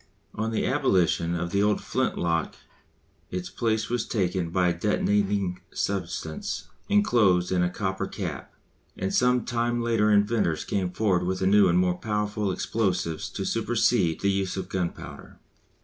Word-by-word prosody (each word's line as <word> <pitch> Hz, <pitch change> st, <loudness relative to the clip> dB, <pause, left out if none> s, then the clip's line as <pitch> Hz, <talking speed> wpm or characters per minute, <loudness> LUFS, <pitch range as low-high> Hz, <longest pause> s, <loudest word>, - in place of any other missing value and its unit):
On 110 Hz, +1 st, -2 dB
the 110 Hz, -, -1 dB
abolition 90 Hz, -, +2 dB
of 85 Hz, 0 st, -3 dB
the 100 Hz, -, +2 dB
old 105 Hz, 0 st, +2 dB
flint -, -, -1 dB
lock 85 Hz, -1 st, -1 dB, 0.7 s
its 90 Hz, 0 st, -5 dB
place 110 Hz, -2 st, 0 dB
was 120 Hz, -1 st, -1 dB
taken 90 Hz, -5 st, -1 dB
by 90 Hz, +1 st, +2 dB
a -, -, +1 dB
detonating 100 Hz, 0 st, 0 dB
substance 85 Hz, -4 st, -3 dB, 0.2 s
enclosed 110 Hz, -, +3 dB
in 90 Hz, -1 st, +2 dB
a 90 Hz, -, +2 dB
copper 95 Hz, +1 st, -3 dB
cap, -, -, -6 dB, 0.5 s
and 95 Hz, -, -2 dB
some 125 Hz, 0 st, +3 dB
time 120 Hz, 0 st, 0 dB
later 115 Hz, -2 st, +2 dB
inventors 105 Hz, -6 st, +2 dB
came 95 Hz, -3 st, -1 dB
forward 95 Hz, -1 st, +1 dB
with 95 Hz, +1 st, -2 dB
new 100 Hz, +2 st, +5 dB
and 85 Hz, -, +3 dB
more 90 Hz, -1 st, +1 dB
powerful 105 Hz, -1 st, -1 dB
explosives 90 Hz, -5 st, -1 dB
to -, -, -5 dB
supersede 80 Hz, -2 st, +1 dB
the 100 Hz, -, +2 dB
use 95 Hz, -1 st, -1 dB
of 95 Hz, -1 st, -4 dB
gunpowder. 90 Hz, -3 st, -5 dB
95 Hz, 150 wpm, -26 LUFS, 90-105 Hz, 0.7 s, new